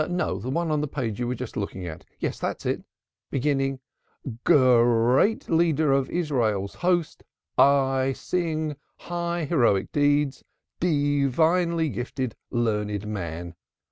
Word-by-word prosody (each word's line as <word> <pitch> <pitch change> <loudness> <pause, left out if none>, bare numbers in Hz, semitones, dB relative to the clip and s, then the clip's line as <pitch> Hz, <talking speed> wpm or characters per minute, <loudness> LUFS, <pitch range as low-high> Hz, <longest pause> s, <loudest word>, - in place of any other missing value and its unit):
No, 175 - -1
the 120 +6 -5
one 165 +3 -1
on 150 -1 +1
the 150 - -1
page 120 -7 -3
you 120 - -1
were 125 - -1
just 125 -1 -7
looking 95 -2 -4
at. 80 -2 -8
Yes, - - -3
that's - - -3
it, - - -1 0.5
beginning: 135 -1 0 0.6
"'Great 125 - +4
leader 160 -3 +2
of 135 -1 +2
our - - -10
Israel's 115 - 0
host, 175 -2 0 0.3
I 135 -1 +3
sing 160 -3 -2
thy 150 - -6 0.2
high 170 -1 -3
heroic 120 - +2
deeds, 145 -1 +1 0.4
Divinely 160 +2 +2
gifted 125 -1 -4
learned 105 -3 -1
man.' 85 -4 -5
135 Hz, 135 wpm, -25 LUFS, 120-160 Hz, 0.6 s, Great